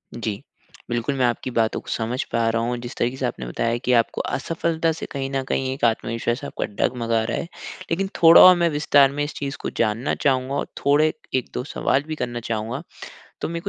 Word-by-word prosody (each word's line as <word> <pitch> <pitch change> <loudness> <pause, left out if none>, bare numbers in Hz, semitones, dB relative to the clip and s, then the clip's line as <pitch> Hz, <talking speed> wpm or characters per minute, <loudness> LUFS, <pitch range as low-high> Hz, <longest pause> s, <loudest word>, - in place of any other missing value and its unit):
जी। 110 -3 -4 0.5
बिल्कुल, 120 +4 -1
मैं 130 - +2
आपकी 120 +1 -1
बातों 115 -2 +1
को - - -25
समझ 120 +3 -1
पा 115 -1 +1
रहा 115 0 0
हूँ 120 +1 -1
जिस 120 - -7
तरीके 125 +2 -1
से 130 - -2
आपने 65 - -4
बताया 115 - -1
कि 125 - +3
आपको 115 -1 +2
असफलता 165 +2 -1
से 160 - -5
कहीं 135 -1 -3
न 135 -1 -1
कहीं 130 -1 0
एक 135 - -10
आत्मविश्वास 115 +3 -1
आपका - - -3
डग-मगा 115 +1 -1
रहा - - -2
है 170 - -4 0.4
लेकिन 190 +3 0
थोड़ा 165 0 +9
और 185 0 +10
मैं 170 -1 +2
विस्तार 145 -2 +4
में 145 +1 -2
इस 145 - -4
चीज 140 -1 -4
को - - -1
जानना 115 +4 0
चाहूँगा 135 0 +1
और - - -2 0.2
थोड़े 150 +2 +4 0.2
1-2 125 -1 -2
सवाल 140 -1 0
भी 155 - -3
करना 120 -3 -3
चाहूँगा। 115 +7 -3 0.6
तो - - -2
मेरे 170 0 -3
130 Hz, 210 wpm, -23 LUFS, 115-145 Hz, 0.6 s, और